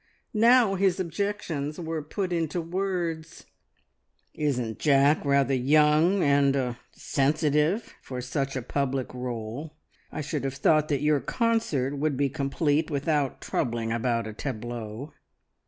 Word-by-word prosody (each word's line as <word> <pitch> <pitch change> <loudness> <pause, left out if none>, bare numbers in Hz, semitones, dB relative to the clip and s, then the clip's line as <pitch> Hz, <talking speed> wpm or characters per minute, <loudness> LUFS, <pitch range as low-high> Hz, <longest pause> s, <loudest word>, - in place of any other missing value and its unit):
Now 230 -1 +5
his 190 -1 +1
objections 170 -5 -3
were 165 -2 -3
put 180 +5 -3
into 165 0 -1
words 170 -2 -3 0.9
"Isn't 125 -7 -2
Jack 145 0 +4
rather 140 -2 +2
young 150 +7 +4
and 140 -1 +3
er 125 -3 -1
sensitive 150 - 0
for 130 -1 -6
such 135 +2 -2
a 130 - -3
public 135 0 -2
role? 125 +4 -5 0.4
I 155 - -4
should 150 -2 -3
have 135 0 -2
thought 155 +2 +3
that 145 -2 -1
your 150 -1 +3
concert 220 - 0
would 150 -2 0
be 140 0 +1
complete 145 +2 0
without 145 -1 -1
troubling 115 -2 -2
about 115 0 0
a 110 - -6
tableau. 120 +2 -6
145 Hz, 130 wpm, -27 LUFS, 130-165 Hz, 0.9 s, Now